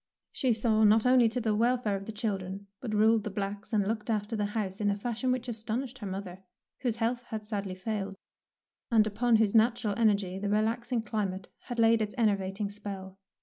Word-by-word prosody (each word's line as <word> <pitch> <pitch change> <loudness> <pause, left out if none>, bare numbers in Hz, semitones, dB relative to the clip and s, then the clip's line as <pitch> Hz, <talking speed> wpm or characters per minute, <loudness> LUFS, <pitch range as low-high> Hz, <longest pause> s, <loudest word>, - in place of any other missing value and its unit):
She 260 -3 +1
saw 220 -1 +2
not 215 +2 +5
only 250 -2 +5
to 245 +3 -2
the 220 -2 0
welfare 235 -1 +1
of 195 0 -5
the - - -3
children, 200 -3 -3
but 220 -4 -3
ruled 220 +1 +4
the 215 - -3
blacks 200 +2 -4
and 205 -3 +2
looked 220 +1 -2
after 215 0 -1
the 210 -1 0
house 195 -1 -2
in 205 - +2
a 200 - 0
fashion 240 +4 -1
which 255 -1 -1
astonished 240 +3 -3
her 205 - -5
mother, 190 -1 -6 0.4
whose 245 -4 -1
health 235 +1 0
had 215 -1 -5
sadly 200 -3 -3
failed, 195 0 -3 0.7
and 220 -2 +5
upon 225 +3 +2
whose 215 -2 +3
natural 225 -2 +3
energy 200 -4 +2
the 205 +1 -2
relaxing 230 +3 0
climate 195 -4 -3 0.2
had 245 - -5
laid 230 0 +4
its 210 -1 -2
enervating 200 -2 0
spell. 195 -2 -7
215 Hz, 195 wpm, -30 LUFS, 200-230 Hz, 0.7 s, not